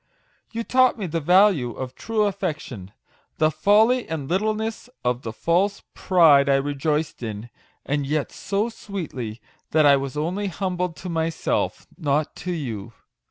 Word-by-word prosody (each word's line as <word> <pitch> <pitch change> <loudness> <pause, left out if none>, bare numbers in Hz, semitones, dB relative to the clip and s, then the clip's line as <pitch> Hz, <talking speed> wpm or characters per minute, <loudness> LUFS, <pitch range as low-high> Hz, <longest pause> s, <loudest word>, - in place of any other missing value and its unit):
You 230 0 -3
taught 255 +1 +3
me 205 - -3
the 165 -1 -2
value 175 - +4
of 130 -1 -6
true 220 - -1
affection 145 - -3 0.5
the 155 0 +3
folly 215 +10 +3
and 155 -4 -3
littleness 215 - -1 0.2
of 125 0 +1
the 115 - -5
false 180 - 0
pride 155 -7 +5
I 135 - +5
rejoiced 145 +2 -1
in; 110 0 -6 0.3
and 140 0 -1
yet 150 0 -1
so 200 +3 -1
sweetly, 150 - -6 0.3
that 155 -1 +4
I 140 -1 +7
was 135 +1 -4
only 180 +7 -1
humbled 180 -2 -2
to - - -3
myself 165 -1 -1
not 150 -1 0
to 180 - -4
you. 115 - -5
160 Hz, 150 wpm, -23 LUFS, 140-195 Hz, 0.5 s, I